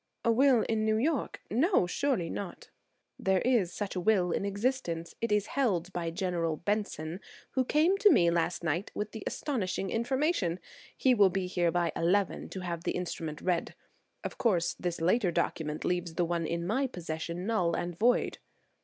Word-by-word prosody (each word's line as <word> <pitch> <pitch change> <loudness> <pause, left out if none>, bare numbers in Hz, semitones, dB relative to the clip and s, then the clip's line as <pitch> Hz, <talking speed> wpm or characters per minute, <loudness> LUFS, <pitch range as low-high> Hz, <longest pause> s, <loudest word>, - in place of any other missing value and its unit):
"A 230 - +5
will 255 -1 +5
in 220 -1 0
New 220 0 +2
York? 280 +3 -1
No–surely 255 - +2
not!" 185 +1 -6 0.5
"There 190 -1 +2
is 230 -9 +2
such 200 +1 -4
a - - 0
will 185 -2 +2
in 195 - -1
existence; 200 -5 -2
it 230 -1 -1
is 210 -1 +3
held 190 -10 0
by 170 -1 -2
General 170 -2 -1
Benson, 180 -4 -2 0.3
who 260 - +1
came 320 +9 +3
to 420 - +7
me 170 - +5
last 170 +1 0
night 170 +5 -1
with 210 0 -3
the 220 - -7
astonishing 195 -8 -2
information. 235 - 0 0.4
He 260 - +4
will 205 -5 +6
be 190 0 -1
here 175 -1 +1
by 170 0 +1
eleven 190 +3 +1
to 190 - -6
have 170 -2 -4
the - - -1
instrument 165 -4 -4
read. 180 -2 -1 0.5
Of - - -6
course, 175 -7 +2
this 175 -1 -2
later 185 +4 +2
document 155 -2 -2
leaves 175 -2 -1
the 175 - +1
one 170 -1 -1
in 170 0 -2
my 260 +9 +1
possession 170 -3 -5
null 185 -7 +1
and 175 0 -3
void." 240 +7 +2
185 Hz, 175 wpm, -30 LUFS, 170-230 Hz, 0.5 s, to